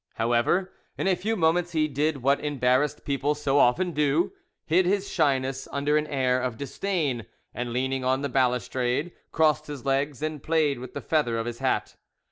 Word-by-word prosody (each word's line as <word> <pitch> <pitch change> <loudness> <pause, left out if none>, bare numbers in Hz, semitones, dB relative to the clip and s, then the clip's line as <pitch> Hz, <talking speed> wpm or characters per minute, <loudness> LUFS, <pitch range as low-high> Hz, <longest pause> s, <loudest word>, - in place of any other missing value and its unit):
However, 120 +12 +1 0.2
in - - -2
a 190 - +3
few 210 +6 -2
moments 175 -1 +1
he 155 -1 +2
did 145 -1 -1
what 140 +2 +3
embarrassed 145 0 +1
people 140 +1 0
so 145 -1 +1
often 175 +10 +3
do, 150 +1 +1 0.3
hid 175 +3 +3
his 200 +1 +1
shyness 135 -3 0
under 145 +2 0
an 150 0 +1
air 130 -3 +1
of 125 -3 -3
disdain, 140 - -2 0.3
and, 120 0 -4
leaning 130 +2 -1
on 130 +2 +1
the - - +1
balustrade, 125 - 0 0.2
crossed 155 -1 +2
his 145 -3 -7
legs 140 +1 0
and 155 -2 -3
played 155 -5 +1
with 130 - -9
the - - -4
feather 145 -8 0
of 115 - -2
his 120 -1 -5
hat. - - -1
140 Hz, 180 wpm, -26 LUFS, 130-155 Hz, 0.3 s, a